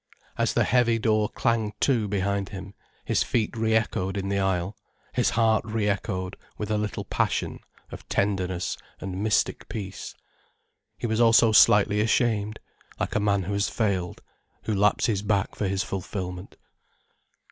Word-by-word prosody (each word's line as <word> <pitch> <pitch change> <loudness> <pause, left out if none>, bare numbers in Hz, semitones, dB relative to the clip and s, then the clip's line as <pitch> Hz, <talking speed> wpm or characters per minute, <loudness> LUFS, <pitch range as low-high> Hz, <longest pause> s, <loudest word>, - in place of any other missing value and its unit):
As - - 0
the - - +4
heavy 120 -2 +3
door 110 -2 +1
clanged 110 -2 -1
to 120 -6 +2
behind 100 0 -1
him, 95 0 -8 0.3
his - - +1
feet 115 -1 0
re 110 0 +1
echoed 100 -3 0
in 100 0 -2
the 100 0 0
aisle, 95 +1 0 0.4
his - - +2
heart 110 -1 +2
re 110 -1 -1
echoed 95 -2 -2 0.2
with 105 0 -4
a 105 - +2
little 105 -1 -3
passion - - -1 0.3
of - - -10
tenderness 95 -3 -1 0.2
and 95 0 -5
mystic 110 0 0
peace. 100 -3 -6 0.8
He - - -4
was 110 0 +1
also 115 -1 +6
slightly 105 -1 +5
ashamed, 110 -1 +1 0.4
like - - -2
a - - +2
man 100 -2 +1
who 100 +3 -3
has 100 0 +1
failed, 95 -6 -1 0.4
who 110 - -1
lapses 100 +1 +2
back 100 -1 0
for 105 - -2
his 95 0 0
fulfilment. 90 -1 -5
105 Hz, 155 wpm, -26 LUFS, 95-110 Hz, 0.8 s, also